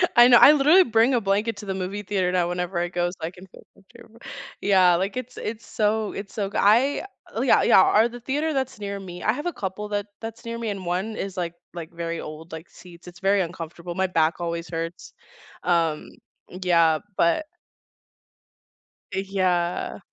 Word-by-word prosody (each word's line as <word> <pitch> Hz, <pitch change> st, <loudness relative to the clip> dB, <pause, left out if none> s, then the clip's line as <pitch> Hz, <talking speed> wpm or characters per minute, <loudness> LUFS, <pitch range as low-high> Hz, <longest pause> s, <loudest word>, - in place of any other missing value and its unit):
I 240 Hz, +1 st, +8 dB
know, 240 Hz, -1 st, +8 dB
I -, -, +9 dB
literally 305 Hz, +6 st, +6 dB
bring 230 Hz, -1 st, +3 dB
a 240 Hz, -, +2 dB
blanket 205 Hz, +2 st, 0 dB
to 205 Hz, -, -9 dB
the 190 Hz, -, -3 dB
movie 190 Hz, +2 st, -4 dB
theater 185 Hz, -2 st, 0 dB
now 180 Hz, -1 st, +1 dB
whenever 180 Hz, 0 st, -2 dB
I 175 Hz, -, 0 dB
go 175 Hz, 0 st, -1 dB
so 180 Hz, -, -11 dB
I 160 Hz, -, -2 dB
can 180 Hz, +1 st, -14 dB
feel -, -, -16 dB
comfortable 225 Hz, +3 st, -18 dB, 0.4 s
Yeah, 185 Hz, -3 st, +5 dB
like, 195 Hz, +7 st, -2 dB
it's 255 Hz, 0 st, -6 dB
it's 225 Hz, +1 st, -5 dB
so 215 Hz, 0 st, -1 dB
it's 200 Hz, 0 st, -7 dB
so 200 Hz, -3 st, -2 dB
goo -, -, -4 dB
l -, -, +2 dB
uh 265 Hz, -, +1 dB
yeah, -, -, +4 dB
yeah -, -, +6 dB, 0.2 s
or 225 Hz, -, +5 dB
the 245 Hz, +1 st, -9 dB
theater 295 Hz, +5 st, -1 dB
that's 265 Hz, -3 st, -3 dB
near 200 Hz, -1 st, -5 dB
me; 180 Hz, -2 st, -9 dB
I 215 Hz, -, +2 dB
have 295 Hz, +6 st, -6 dB
a 350 Hz, -, -2 dB
couple 200 Hz, +2 st, -5 dB
that 205 Hz, 0 st, -2 dB
that's 225 Hz, +1 st, -8 dB
near 230 Hz, 0 st, -4 dB
me 230 Hz, -2 st, -3 dB
and 195 Hz, -3 st, -5 dB
one 185 Hz, +5 st, -2 dB
is, 195 Hz, -1 st, -5 dB
like 170 Hz, -2 st, -2 dB, 0.2 s
like, 170 Hz, -2 st, -8 dB
very 170 Hz, 0 st, -4 dB
old, 155 Hz, +2 st, -9 dB
like, 160 Hz, +1 st, -9 dB
seats 175 Hz, -1 st, -15 dB
it's 175 Hz, -1 st, -12 dB
very 195 Hz, +1 st, +2 dB
uncomfortable, 170 Hz, 0 st, -6 dB
my 190 Hz, +1 st, +1 dB
back 165 Hz, -2 st, +1 dB
always 170 Hz, -1 st, -4 dB
hurts. 165 Hz, 0 st, -6 dB, 0.5 s
Um 165 Hz, -3 st, 0 dB, 0.4 s
Yeah, 170 Hz, -3 st, +2 dB, 0.2 s
but 170 Hz, -, +2 dB, 1.7 s
Uh, 190 Hz, -, -1 dB
yeah. 185 Hz, -3 st, -1 dB
190 Hz, 200 wpm, -24 LUFS, 175-225 Hz, 1.7 s, I